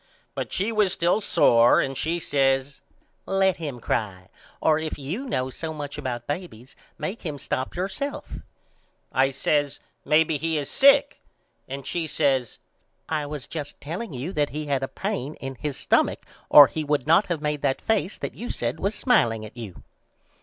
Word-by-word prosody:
But - - -4
she 200 +5 0
was 210 -4 +2
still 175 +6 +1
sore 120 - +5
and 135 0 -1
she 165 +5 -1
says 135 -2 +1 0.5
Let 190 -1 +2
him 145 -7 -5
cry 95 -6 -3 0.3
or 155 -1 +3
if 160 0 -4
you 165 - -4
know 130 - -1
so 160 +3 -5
much 145 -1 -6
about 125 -5 -4
babys 145 -6 -6 0.2
make 200 +5 -4
him 155 -5 -4
stop 130 -1 -3
yourself 195 +11 -4 0.8
I 135 +1 +3
says 145 +1 0 0.2
Maybe 155 +1 +3
he 160 +1 -1
is 145 -2 -3
sick. 275 +1 +5 0.5
And 135 0 -6
she 170 -2 -2
says 135 -6 0 0.5
I 150 -2 -2
was 145 -2 -5
just 150 -3 -6
telling 175 +9 -5
you 140 +8 -5
that 145 -1 +1
he 150 +1 -5
had 140 -2 0
a 135 - -1
pane 155 -8 -4
in 135 0 -6
his 135 +2 -5
stumach - - +1 0.2
or 145 - +11
he 155 +2 -3
would 145 -3 0
not 165 +6 +4
of 170 -3 -1
made 150 -1 -2
that 135 -2 +1
face 210 -4 0
that - - -5
you 240 - -7
said 120 +1 -3
was 200 +2 -1
smileing 115 - +2
at 110 - -12
you. 110 -7 -9
150 Hz, 175 wpm, -25 LUFS, 135-170 Hz, 0.8 s, or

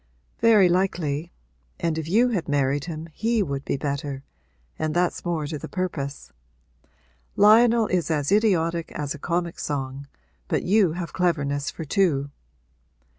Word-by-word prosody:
'Very 215 -5 +6
likely; 175 -4 0 0.5
and 165 -2 0
if 160 -1 -4
you 235 +7 +4
had 190 -11 -2
married 140 0 +1
him 165 -1 -6
he 225 +2 +1
would 140 -4 -4
be - - -2
better, 140 -1 -4 0.6
and 155 0 -1
that's 175 0 0
more 170 -4 -1
to 150 0 -5
the - - -8
purpose. 140 - -4 1.0
Lionel 225 +2 +6
is 180 -5 -1
as 150 -3 0
idiotic 170 -6 +2
as 145 -1 -3
a 155 - -10
comic 170 +2 -2
song, 140 -1 -4 0.4
but - - 0
you 195 -3 +3
have 175 0 -5
cleverness 145 -5 0
for 160 - -7
two.' 145 -6 +1
165 Hz, 145 wpm, -24 LUFS, 145-185 Hz, 1.0 s, Very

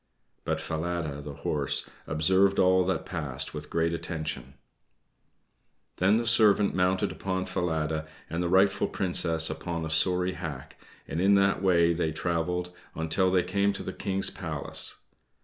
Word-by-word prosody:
But - - -1
Falada, 80 -3 -3
the 70 0 -7
horse, 70 -1 -1 0.2
observed 95 +6 +3
all 95 0 +4
that 95 - -1
passed 75 -8 -3
with 75 -1 -7
great 85 0 0
attention. 80 -2 -5 1.4
Then 100 +4 +3
the 120 - -1
servant 105 -3 +5
mounted 90 0 +1
upon 95 -1 -3
Falada, 80 -3 -2 0.2
and 85 +2 -3
the 85 - -1
rightful 95 +2 +3
Princess 85 -4 +1
upon 85 -2 -4
a 80 - -5
sorry 90 +3 +2
hack; 80 -7 -8 0.3
and 80 +4 -3
in 100 +1 +5
that 100 -1 +2
way 85 -3 +3
they 80 -1 -1
traveled 90 +2 -2 0.2
on 80 0 -3
till 95 +4 +2
they 90 -1 +2
came 100 +3 +1
to 100 - -5
the - - -5
King's 95 0 +1
palace. - - -3
90 Hz, 150 wpm, -28 LUFS, 80-95 Hz, 1.4 s, servant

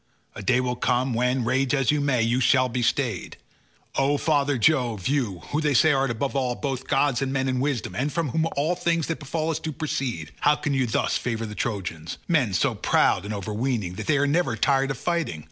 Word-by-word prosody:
A - - -8
day 120 +6 +2
will 125 -1 -1
come 125 +1 0
when, 125 +1 +1
rage 130 +3 +1
as 135 -1 +2
you 150 -1 +1
may, 135 -5 +2
you 120 +2 +1
shall 130 0 +4
be 125 0 -2
stayed. 120 -5 -1 0.6
O 140 +2 +2
father 145 -2 +1
Jove, 120 - +1
you, 120 -11 -1
who 150 - 0
they 150 -3 +1
say 160 +5 +5
art 135 -1 +1
above 125 +5 -2
all, 125 -3 0
both 135 -2 -4
gods 135 -2 +2
and 135 -1 -1
men, 135 -1 0
in 130 -1 0
wisdom, 135 -5 -2
and 140 +4 -1
from 165 -3 -1
whom 160 +6 0
all 155 +5 +1
things 170 -2 0
that 165 - -3
befall 155 +2 -2
us 155 - -2
do 160 - -4
proceed, 135 - -3
how 150 - +4
can 145 -1 -2
you 130 -2 +1
thus 110 - 0
favour 115 -2 -3
the 105 - -7
Trojans—men 100 - -2
so 85 - +2
proud 90 - +2
and 105 - -5
overweening, 105 -1 -2
that - - -7
they 155 - +3
are 140 - +2
never 145 -4 +1
tired 135 +2 +2
of 135 - -3
fighting? 150 - -2
135 Hz, 220 wpm, -25 LUFS, 120-145 Hz, 0.6 s, say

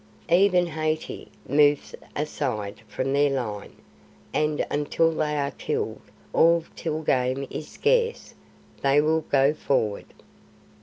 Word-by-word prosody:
Even 180 0 +5
Hathi 155 -1 -3 0.2
moves 145 +1 +3 0.2
aside 125 -9 -3
from 135 +1 -2
their 145 +1 +4
line, 110 -7 -4 0.6
and 150 0 +1
until 150 +3 +1
they 150 -1 -1
are 140 -1 -1
killed, - - -3 0.3
or 170 0 +5
till 160 -1 -3
game 130 -1 +1
is 150 - -5
scarce, 475 +1 0 0.5
they 140 +1 +4
will 160 +2 +2
go 140 -1 +3
forward. 115 -9 -1
150 Hz, 115 wpm, -25 LUFS, 135-160 Hz, 0.6 s, Even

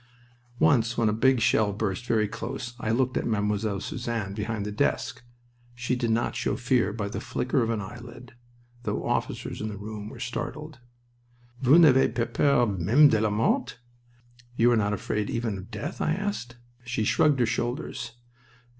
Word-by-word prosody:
Once 120 -7 +3
when 115 -2 +3
a - - +1
big 130 +3 +3
shell 110 -2 +3
burst 105 +3 -3
very 110 -2 +2
close 120 +2 -5
I 110 - -3
looked 130 +3 +1
at - - -1
Mademoiselle 105 -1 0
Suzanne 115 -5 -3
behind 105 0 -3
the 105 - -3
desk. 105 - -1 0.5
She 125 +1 -1
did 120 -2 -1
not 115 +1 0
show - - -1
fear 120 -3 +1
by 105 -1 -3
the 100 - -5
flicker 130 +1 -1
of 115 - 0
an 115 -3 -1
eyelid, 120 +3 -10 0.5
though - - -3
officers - - -2
in 110 - -2
the 105 - -6
room 105 +1 -7
were - - -11
startled. 150 +4 -5 0.8
"Vous 135 +5 +6
n'avez 140 -6 +6
pas 120 -1 0
peur, 140 -4 +4
meme 105 - +4
de 110 -4 +2
la 110 - +2
mort?" 115 +3 0 0.8
("You 120 +1 +5
are - - +4
not 105 -2 +1
afraid, 105 0 -2
even 115 -3 -2
of 95 - -11
death?") 105 -3 -5
I 160 - +1
asked. 195 -10 -3 0.3
She 120 -2 -2
shrugged 145 +5 +3
her 120 - +4
shoulders. 120 +1 -3
115 Hz, 175 wpm, -27 LUFS, 105-125 Hz, 0.8 s, Vous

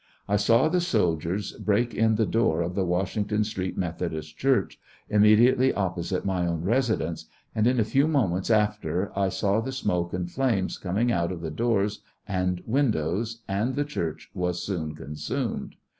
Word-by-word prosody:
1 100 0 +1
saw 115 +8 +4
the 180 +2 +1
soldiers 95 - 0
break 110 +3 +1
in 110 -1 +3
the 110 +1 +2
door 85 -9 +1
ofthe 95 +2 -1
Washington 100 +4 0
Street 95 -3 -4
MethodistChurch, 85 - -1 0.3
imraediately 110 +5 +5
opposite 90 -1 -2
my 90 -2 0
own 85 -1 -2
residence, 110 - 0 0.3
and 110 +1 +2
in 125 0 +2
a - - +4
few 135 +7 +2
moments 100 - +1
after 105 -3 +1
1 95 -1 +1
saw 100 +3 +1
the 130 +3 -4
smoke 90 -9 -1
and 90 -1 -3
flames 120 -8 0
coming 105 +6 0
out 85 -4 0
of 85 -3 -6
the 80 -2 -4
doors 105 +1 0 0.3
and 90 -2 -1
windows, 115 - 0
and 105 +7 -1
the 145 0 0
Church 85 - -4
was 90 -1 -2
soon 80 -6 -3
consumed. 75 - -4
100 Hz, 160 wpm, -26 LUFS, 90-115 Hz, 0.3 s, imraediately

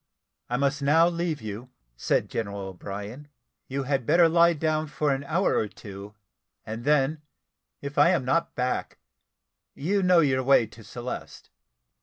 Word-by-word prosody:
"I 120 - 0
must 140 +1 0
now 160 +4 +5
leave 170 -6 -2
you," 110 +4 -7 0.3
said - - 0
General 100 -3 -4
O'Brien; 100 +9 -8 0.4
"you 135 +1 -3
had 135 -2 -1
better 170 0 +6
lie 170 +1 +5
down 155 0 -1
for 150 0 0
an 135 +1 -3
hour 170 +6 +1
or 110 - +1
two, 100 0 -11 0.5
and 115 +3 -6
then, 150 +1 +2 0.6
if 140 +1 -3
I 145 - +7
am 175 -8 +1
not 165 +6 0
back, 125 0 -2 0.8
you 195 +8 0
know 180 -2 +5
your 130 -3 +2
way 130 -2 +4
to 110 +1 -15
Celeste." 120 +3 -7
140 Hz, 155 wpm, -26 LUFS, 115-160 Hz, 0.8 s, I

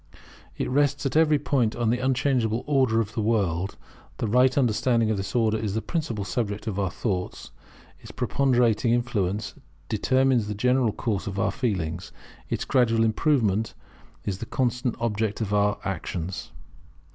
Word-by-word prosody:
It - - -1
rests 145 +2 +1
at 135 - -1
every 155 -1 +5
point 130 -6 0
upon 120 -2 +1
the 125 - 0
unchangeable 125 -3 +1
Order 130 -6 +2
of 110 0 -5
the 110 - -1
world. 100 -4 0 0.4
The - - -2
right 125 +5 +3
understanding 115 -2 +2
of 110 - 0
this 95 +4 -5
order 110 -2 +2
is 105 -2 -2
the 110 - 0
principal 115 - -2
subject 105 +1 -2
of 105 -3 -3
our 95 -2 0
thoughts; 90 -1 -4 0.5
its - - -13
preponderating 120 -3 +2
influence 105 -5 -1 0.4
determines 130 +1 +2
the 105 - -3
general 125 +1 +2
course 105 -3 -2
of 100 0 -4
our - - +1
feelings; 90 - -2 0.4
its - - -2
gradual 115 -4 +3
improvement 110 -3 +1 0.5
is 95 -2 -3
the 115 - -6
constant 125 -1 -1
object 110 -2 -1
of 105 -2 -2
our 105 0 +2
actions. 90 -1 -4
115 Hz, 155 wpm, -25 LUFS, 105-125 Hz, 0.5 s, every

